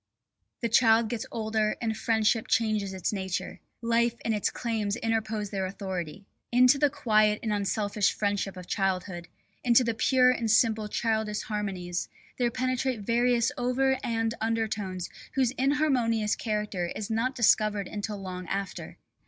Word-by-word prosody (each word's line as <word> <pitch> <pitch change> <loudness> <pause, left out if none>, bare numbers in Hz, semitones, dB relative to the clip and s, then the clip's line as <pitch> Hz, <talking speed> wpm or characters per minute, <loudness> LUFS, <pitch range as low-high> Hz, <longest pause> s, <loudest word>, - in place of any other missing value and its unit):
The 235 - 0
child 225 -1 +4
gets 230 -1 -4
older 220 -1 0
and 225 -2 -1
friendship 220 0 +1
changes 215 -3 +1
its 190 +2 -2
nature. 190 -2 -3 0.2
Life 235 0 +2
and 225 - +1
its 210 - 0
claims 220 -4 -2
interpose 220 -3 -2
their 190 -2 -1
authority. 190 -2 -5 0.3
Into 250 +3 +5
the 290 0 +4
quiet 215 -5 +2
and 220 -2 0
unselfish 205 0 0
friendship 200 -2 -2
of 180 - -8
childhood, 185 -2 -2 0.4
into 245 0 +5
the 230 -1 0
pure 255 +2 +4
and 235 -3 -1
simple 220 -1 +3
childish 220 -1 -1
harmonies 190 -5 -3 0.3
there 245 -1 +2
penetrate 255 -1 -1
various 240 +3 +2
over 265 +2 +1
and 225 -1 0
under 225 0 0
tones 190 -4 -4 0.3
whose 260 -3 +2
inharmonious 260 -6 +1
character 210 -5 -2
is 215 +1 -4
not 240 +4 0
discovered 215 -4 +3
until 210 0 -4
long 185 -2 -6
after. 195 -1 -4
220 Hz, 145 wpm, -28 LUFS, 205-235 Hz, 0.4 s, Into